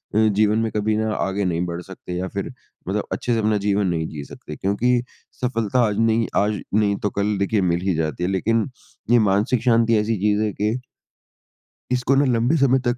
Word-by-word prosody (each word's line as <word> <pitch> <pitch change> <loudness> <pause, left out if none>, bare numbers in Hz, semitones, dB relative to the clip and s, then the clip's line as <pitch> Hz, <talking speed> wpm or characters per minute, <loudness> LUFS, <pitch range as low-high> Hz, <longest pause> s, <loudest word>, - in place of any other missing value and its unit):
अ, - - +3
जीवन 105 +1 +2
में 115 -1 -1
कभी 105 +1 0
ना 110 0 0
आगे 95 0 -1
नहीं 85 -1 0
बढ़ 85 0 -4
सकते 90 -1 -9
या 90 +1 -2
फिर - - -4 0.4
मतलब - - -2
अच्छे 120 - -1
से 115 - +1
अपना 110 -1 +2
जीवन 100 -1 +1
नहीं 80 -2 -1
जी 75 -2 -7
सकते, 75 - -10
क्योंकि 120 +7 +1 0.4
सफलता 120 -2 0
आज 105 -1 -2
नहीं 115 0 +2
आज 105 +1 +1
नहीं 105 -1 +3
तो 105 - +2
कल 100 +1 -1
देखिए 100 +2 +1
मिल 85 -1 +1
ही 95 - +3
जाती 80 0 -2
है 90 - +1
लेकिन 110 +5 +1 0.4
ये 120 - +6
मानसिक 105 +5 +1
शांति 115 -2 +3
ऐसी 105 +1 0
चीज़ 105 0 +2
है 105 - 0
कि 105 +3 -1 1.1
इसको 125 +2 +2
ना 140 +1 +4
लंबे 120 +3 +2
समय 135 -2 +4
तक 120 0 +1
105 Hz, 210 wpm, -22 LUFS, 95-115 Hz, 1.1 s, ये